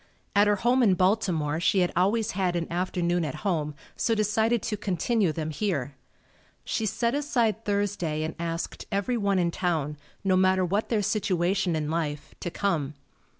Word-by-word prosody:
At 205 +1 +5
her 205 - +4
home 245 +6 +2
in 200 -6 +5
Baltimore 180 -6 +1
she 190 +2 +3
had 180 - +1
always 210 +5 +2
had 180 -2 0
an 170 -1 0
afternoon 175 -1 0
at 150 -4 -3
home, 155 -6 0 0.2
so 225 - +1
decided 220 +1 +1
to 215 - -1
continue 200 0 0
them 155 0 -3
here. 145 - -2 0.7
She 220 - -1
set 235 +3 0
aside 240 -7 0
Thursday 200 -7 -1
and 160 - -3
asked 165 0 -4
everyone 200 -1 +1
in 175 -2 +2
town, 155 -5 -1 0.3
no 190 -1 +3
matter 185 0 +3
what 200 +5 -1
their 215 -3 +1
situation 185 -3 +1
in 155 -1 -2
life, 150 -3 -3
to - - -3
come. 160 -7 -1
185 Hz, 165 wpm, -27 LUFS, 165-210 Hz, 0.7 s, At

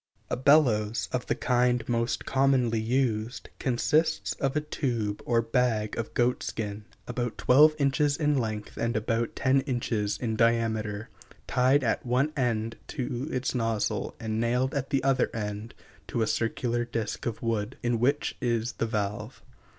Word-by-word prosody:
] - - -37
A - - +2
bellows, 120 -6 +3
of 125 -1 -2
the - - +1
kind 125 -2 +1
most 115 0 -1
commonly 130 -4 +2
used, 115 -1 -1
consists 150 +6 +1
of 135 +1 -1
a 150 - +2
tube 120 -9 -2
or 115 -1 +3
bag 115 -3 0
of 115 - -5
goatskin, 110 -4 -1 0.2
about 120 -1 -3
twelve 150 +4 +6
inches 145 0 +2
in 150 -2 +2
length 110 -5 -3
and 115 -1 0
about 115 +2 -1
ten 135 +1 +3
inches 120 -6 -1
in 115 -3 -2
diameter, 110 -2 +1 0.4
tied 130 +3 +3
at 115 - 0
one 130 +5 +1
end 115 -4 -1
to 125 -1 -3
its 130 0 -1
nozzle 115 -3 -1
and 110 0 -2
nailed 125 +3 +1
at 140 -1 -2
the 135 -2 +1
other 135 -2 +3 0.8
to 115 - 0
a - - +2
circular 120 +2 -1
disk 115 -2 -3
of 115 0 -4
wood, 115 +1 -1
in 120 -1 +1
which 140 +5 +1
is 120 -1 0
the 115 - +1
valve. 105 +3 -3
120 Hz, 155 wpm, -28 LUFS, 110-130 Hz, 0.8 s, twelve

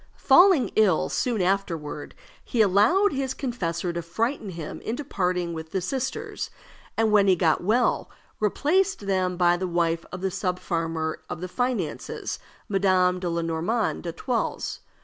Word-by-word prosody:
Falling 360 -7 +5
ill 200 -7 +3
soon 230 -6 0
afterward, 170 -6 -2 0.3
he 240 - -3
allowed 220 - +4
his 265 -1 -2
confessor 175 - -2
to 170 - -2
frighten 220 - -2
him 165 -4 -7
into 245 +6 -3
parting 180 -8 -1
with 160 -1 -6
the 190 - -1
sisters, 260 +8 -3 0.5
and 225 -1 +3
when 205 -2 +5
he 190 - +6
got 165 -2 +2
well 235 +6 +2 0.3
replaced 345 - +1
them 185 -2 0
by 175 -1 +4
the 185 +1 -2
wife 170 -1 0
of 180 - -6
the 190 0 -1
subfarmer 165 -4 -2
of - - -5
the 185 - -4
finances, 240 -4 -3 0.3
Madame 185 -2 +2
le 170 -2 -1
Normand 170 +8 -1
d'Etoiles. 180 +9 -2
185 Hz, 145 wpm, -25 LUFS, 170-230 Hz, 0.5 s, he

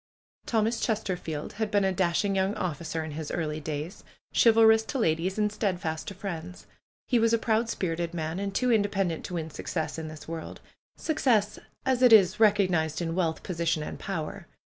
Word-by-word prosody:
Thomas 225 0 +1
Chesterfield 180 -8 -2
had 220 0 -2
been 205 -1 +2
a 190 - +2
dashing 185 +2 +1
young 190 +2 +1
officer 165 -4 -3
in 155 - -6
his 150 0 -5
early 155 -2 -2
days; 155 +5 -5 0.3
chivalrous 225 -1 +6
to 275 - -3
ladies, 180 -2 0
and 210 -1 +1
steadfast 180 -8 -2
to 200 - -6
friends. 180 -2 -6 0.4
He 245 - +2
was 230 0 +3
a - - +5
proud 225 0 +1
spirited 170 -4 -2
man, 165 +1 -3
and 200 0 -2
too 250 +5 +1
inde 205 -3 +2
pendent 185 -5 -1
to 180 - -5
win 160 -1 -4
success 160 -1 -3
in 160 - -5
this 155 -1 -10
world; 165 -1 -6 0.4
success 245 - +1 0.3
as 260 -1 +1
it 250 -2 +7
is 205 -4 +6
recognized 185 -7 +3
in 165 -2 -2
wealth, 165 -3 -1
position 165 -3 -1
and - - -7
power. 170 -6 -5
185 Hz, 185 wpm, -28 LUFS, 160-215 Hz, 0.4 s, it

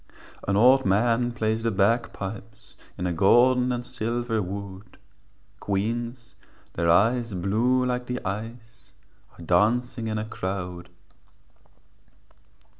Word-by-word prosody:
An 100 0 +1
old 130 +4 +6
man 115 +5 +2
plays 110 -1 -1
the 115 - 0
bagpipes 105 0 -2 0.2
In 90 - -3
a 90 - 0
golden 125 +8 +4
and 120 0 -3
silver 120 -2 -2
wood, 100 +1 -7 0.6
Queens, 115 +4 -3 0.4
their 85 0 0
eyes 115 +4 +2
blue 115 +8 +1
like 125 0 -2
the 125 0 -3
ice, 115 +3 -7 0.4
Are 85 - -11
dancing 115 +6 +1
in 110 0 -2
a 105 - -3
crowd. 90 -4 -5
115 Hz, 115 wpm, -25 LUFS, 100-120 Hz, 0.6 s, old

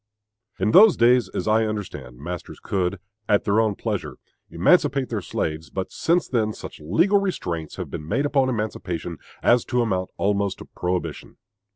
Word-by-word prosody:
In 100 +3 +1
those 210 - +8
days, 120 +1 +4
as - - -4
I 110 +1 +3
understand, 75 - -6
masters 85 +5 -7
could, 95 0 -1 0.3
at 105 -1 +4
their 105 +2 +3
own 110 -2 +1
pleasure, - - -3 0.3
emancipate 140 - +3
their 110 -3 -2
slaves; 80 -2 -3
but 95 -1 -4
since 170 +2 +1
then 110 -4 0
such - - -9
legal 170 - +3
restraints 85 - -3
have - - -6
been 75 - -6
made 140 - 0
upon 135 -2 +2
emancipation 90 -7 -3 0.2
as 120 0 +4
to 125 -1 +1
amount 95 -5 -1
almost 100 -1 0
to - - -10
prohibition. 90 0 -4
105 Hz, 165 wpm, -23 LUFS, 90-125 Hz, 0.3 s, those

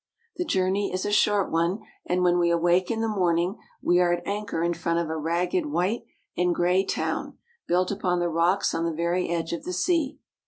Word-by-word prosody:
The 360 - -1
journey 190 - 0
is 185 0 -2
a 205 - -1
short 205 -1 +2
one, 170 +5 +1 0.3
and 180 0 +1
when 175 0 +3
we 170 -1 +3
awake 175 +2 +2
in 225 -1 -1
the 225 - 0
morning, 180 -2 0 0.2
we 175 0 +4
are 175 -1 +3
at 175 0 -1
anchor 205 -4 -2
in 170 0 +1
front 170 0 -1
of 170 -2 -1
a - - -2
ragged 175 - 0
white 225 -1 -1 0.3
and 180 -1 +1
gray 180 +2 +2
town - - -3 0.3
built 180 +2 +1
upon 185 -3 0
the 175 - +1
rocks 170 +4 +1
on 165 - -1
the 170 - 0
very 170 +3 -1
edge 170 -1 -2
of 170 - -4
the 180 - -4
sea. 305 - 0
180 Hz, 210 wpm, -26 LUFS, 170-200 Hz, 0.3 s, we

